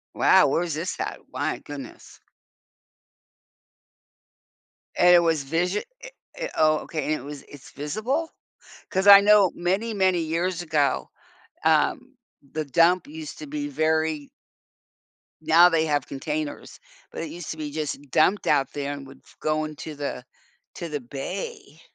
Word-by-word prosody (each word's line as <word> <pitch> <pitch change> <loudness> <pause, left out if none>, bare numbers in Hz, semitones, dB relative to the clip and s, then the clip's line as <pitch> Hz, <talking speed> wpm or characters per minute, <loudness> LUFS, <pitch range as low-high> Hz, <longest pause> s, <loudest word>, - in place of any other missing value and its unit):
Wow, - - +5
where's 165 +3 0
this 170 +4 -3
at? - - -4
My - - -2
goodness. - - -11 2.8
And 180 0 +7
it - - +8
was 165 -4 +1
visio 175 +7 0 0.2
eh - - -8 0.3
eh - - -4
oh, 155 0 +4
okay, 155 -3 -4
and 155 - 0
it 145 - -4
was 145 -1 -8
it's 145 -2 -14
visible? 220 - -2 0.6
'Cause 190 0 0
I 200 0 +11
know 205 -2 +5
many, 195 +6 -1
many 190 -3 +2
years 170 +2 -1
ago, 150 -4 0 0.6
um, - - +1 0.4
the 155 0 -2
dump 170 - +3
used 315 0 -8
to 300 - -8
be 290 0 -4
very 155 - 0 1.1
now 165 +3 +6
they 165 -2 +2
have 145 -3 0
containers, 150 +1 -5 0.3
but - - -6
it 165 - -5
used 170 0 -7
to 160 - -6
be 150 -1 -4
just 145 -2 -5
dumped 180 +8 +2
out 135 - +2
there 145 0 -3
and 140 -1 -8
would 135 - -14
f - - -22
go 155 0 0
into 155 0 -7
the 140 -3 -5 0.5
to 170 - -5
the 145 -3 -4
bay. 145 +4 -7
160 Hz, 150 wpm, -25 LUFS, 150-185 Hz, 2.8 s, I